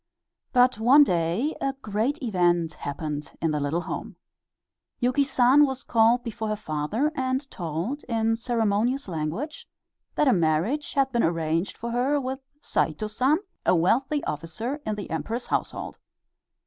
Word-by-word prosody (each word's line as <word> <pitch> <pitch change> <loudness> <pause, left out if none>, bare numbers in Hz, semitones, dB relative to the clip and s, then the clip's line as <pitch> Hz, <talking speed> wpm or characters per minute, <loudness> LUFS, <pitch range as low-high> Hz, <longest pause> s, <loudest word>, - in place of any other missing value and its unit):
But 250 -3 +4
one 265 +6 +7
day 180 - 0
a 275 - 0
great 235 +2 -2
event 175 -6 +1
happened 150 +1 -5
in 165 -1 0
the 150 - 0
little 145 +4 -1
home. - - -6 0.8
Yuki 255 +3 +2
San 270 +1 +5
was 265 -2 -1
called 230 +1 +3
before 225 -2 -4
her 215 - 0
father 205 - -1
and 260 0 -1
told, 175 - -4
in 225 -1 +1
ceremonious 230 +2 0
language, 170 - -4 0.5
that 300 - +2
a 260 - +6
marriage 175 - 0
had 270 -1 +2
been 235 -2 +1
arranged 165 +2 0
for 235 +1 -4
her 260 +5 +1
with 260 0 -4 0.2
Saito 160 +7 -1
San, 255 +8 +2 0.3
a - - +4
wealthy 260 - +2
officer 195 - -4
in 215 - 0
the 205 - -6
Emperor's 225 +9 -3
household. - - -3
225 Hz, 150 wpm, -26 LUFS, 170-265 Hz, 0.8 s, one